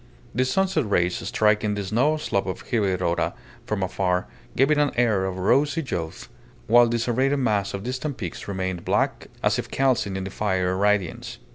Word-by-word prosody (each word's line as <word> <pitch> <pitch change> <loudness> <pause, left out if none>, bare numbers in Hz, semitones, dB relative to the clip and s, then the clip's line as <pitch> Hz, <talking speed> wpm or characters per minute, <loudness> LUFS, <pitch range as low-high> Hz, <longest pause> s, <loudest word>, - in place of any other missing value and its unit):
The 130 +3 +1
sunset 160 - +1
rays 90 -2 +2
striking 105 -1 +2
the 100 - -3
snow 125 +11 +1
slope 100 -11 -1
of 95 - -5
Higuerota 95 -6 0 0.3
from 105 -3 -1
afar 90 -1 0 0.3
gave 135 +3 +3
it 150 - +3
an 145 -1 +3
air 110 -5 +2
of 95 -1 -3
rosy 140 - +2
youth, 80 -7 -4 0.4
while 120 +2 +6
the 120 - +1
serrated 130 +4 +1
mass 105 -7 0
of 100 - -6
distant 130 +3 -3
peaks 90 -7 -6
remained 95 -3 -3
black, - - 0 0.2
as - - +2
if - - -5
calcined 125 -7 +1
in 95 - -3
the 95 - -6
fiery 95 -3 0
radiance. 100 -2 0
105 Hz, 175 wpm, -24 LUFS, 95-130 Hz, 0.4 s, while